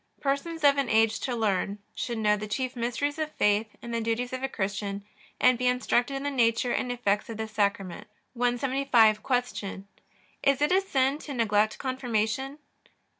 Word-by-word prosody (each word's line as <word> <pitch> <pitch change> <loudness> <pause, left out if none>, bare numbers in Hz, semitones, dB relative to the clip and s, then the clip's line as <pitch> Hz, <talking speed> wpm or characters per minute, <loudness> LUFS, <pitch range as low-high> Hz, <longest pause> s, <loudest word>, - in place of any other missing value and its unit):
Persons 300 +4 -2
of 285 -1 +5
an 270 -4 0
age 220 0 +3
to 255 -3 -2
learn 205 -2 0 0.2
should 235 -2 -3
know 210 -1 +3
the 210 +1 -5
chief 255 +4 -2
mysteries 245 +5 -2
of 310 0 -2
faith 210 +2 +2 0.2
and 235 - -6
the 230 - 0
duties 230 +3 -2
of 255 - -3
a 270 - -1
Christian, 200 -1 -3 0.4
and 250 -1 +4
be 250 - +1
instructed 250 +1 +1
in 270 - -4
the 285 - -1
nature 240 -1 +2
and 250 - -1
effects 210 -4 0
of 225 - -5
this 220 0 -5
Sacrament. 200 -2 -1 0.3
175. 245 -3 +3 0.3
Q. 195 -1 -6 0.6
Is 275 -1 +3
it 295 +2 +2
a 380 +1 +4
sin 275 -6 +1
to 290 -3 -7
neglect 215 -2 +2
Confirmation? 255 +1 -2
240 Hz, 175 wpm, -27 LUFS, 215-270 Hz, 0.6 s, of